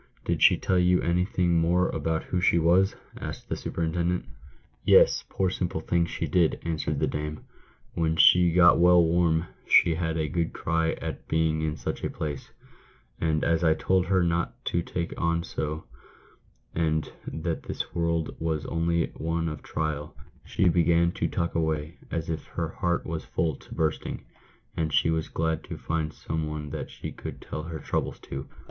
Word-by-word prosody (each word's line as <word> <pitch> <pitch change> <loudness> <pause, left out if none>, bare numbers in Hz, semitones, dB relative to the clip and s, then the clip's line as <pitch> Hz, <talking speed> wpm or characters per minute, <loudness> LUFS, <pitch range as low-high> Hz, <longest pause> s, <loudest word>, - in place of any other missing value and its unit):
" - - -32
Did - - -1
she - - +7
tell 95 -1 +1
you 90 0 +4
anything 90 0 +2
more 90 +2 +3
about 80 +1 -1
who 90 - -2
she 85 - +4
was 90 +4 +3
?" - - -18
asked - - -7
the - - -1
superintendent. 85 +2 -1 0.3
" - - -35
Yes, - - +5
poor 95 -2 0
simple 90 -3 -2
thing, 85 +1 +1
she 85 - -3
did," 80 +2 +2
answered 80 -2 -2
the - - +2
dame; 75 0 -4 0.3
" - - -33
when 80 -1 0
she 90 +1 +6
got 85 0 +6
well 90 0 +6
warm, 85 -1 +2 0.2
she 85 - +6
had 80 0 -1
a 80 -1 0
good 85 +3 -1
cry 80 0 0
at - - -6
being 80 -1 +1
in 80 -1 -1
such - - -4
a - - 0
place; 75 -2 -5 0.7
and 80 -1 +1
as 85 +1 +2
I 80 -2 +4
told 95 +1 +1
her 95 -1 +3
not 85 0 -1
to 85 - 0
take 85 0 -4
on 85 0 +1
so, 75 0 -4 0.9
and 80 -2 0 0.2
that 80 +1 -3
this - - -5
world 85 -1 -1
was 80 -2 -1
only 85 0 0
one 80 +1 -1
of 75 -3 -5
trial, 75 -1 -3 0.3
she 95 - +1
began 85 0 +3
to - - -1
talk 85 - -2
away 80 0 -1
as 80 -1 -3
if 80 -2 -3
her - - -3
heart 85 -1 -1
was 80 -2 -4
full 80 -3 -1
to - - -12
bursting, 80 -2 -2 0.5
and 80 -1 -1
she 80 - +3
was 80 -1 -1
glad 80 -1 -1
to - - -6
find 80 -1 -2
some 80 0 -4
one 75 -1 -5
that - - -5
she - - -7
could - - -8
tell 75 - -6
her 80 0 -6
troubles - - -2
to." 70 0 -7
80 Hz, 185 wpm, -27 LUFS, 80-85 Hz, 0.9 s, she